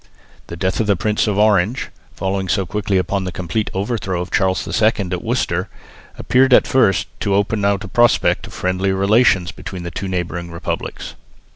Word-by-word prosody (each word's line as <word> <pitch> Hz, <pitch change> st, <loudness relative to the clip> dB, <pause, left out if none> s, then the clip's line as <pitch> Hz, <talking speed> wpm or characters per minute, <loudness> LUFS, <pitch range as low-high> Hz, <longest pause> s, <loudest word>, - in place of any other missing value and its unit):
The 85 Hz, -, -7 dB
death 95 Hz, +1 st, -1 dB
of 110 Hz, -, 0 dB
the 100 Hz, -, +3 dB
Prince 105 Hz, +3 st, 0 dB
of 105 Hz, -2 st, 0 dB
Orange, 105 Hz, +2 st, +2 dB, 0.3 s
following 95 Hz, 0 st, -2 dB
so 95 Hz, 0 st, +1 dB
quickly 100 Hz, +1 st, -1 dB
upon 95 Hz, +2 st, -1 dB
the 95 Hz, -, -4 dB
complete 90 Hz, +5 st, -3 dB
overthrow 95 Hz, -2 st, -2 dB
of 90 Hz, -, -5 dB
Charles 95 Hz, -1 st, +1 dB
II 110 Hz, -1 st, +2 dB
at 90 Hz, -4 st, -3 dB
Worcester, 100 Hz, -6 st, -1 dB, 0.5 s
appeared 130 Hz, 0 st, +3 dB
at -, -, +4 dB
first 95 Hz, -9 st, +2 dB
to 100 Hz, -, 0 dB
open 100 Hz, +1 st, 0 dB
out 100 Hz, 0 st, +1 dB
a -, -, -6 dB
prospect 120 Hz, +5 st, +2 dB
of -, -, -13 dB
friendlier 95 Hz, +1 st, -1 dB
relations 100 Hz, -2 st, +3 dB
between 90 Hz, -2 st, -8 dB
the 85 Hz, -, -5 dB
two 95 Hz, +4 st, -5 dB
neighbouring 90 Hz, -1 st, -3 dB
republics. 85 Hz, 0 st, -5 dB
95 Hz, 180 wpm, -19 LUFS, 90-105 Hz, 0.5 s, at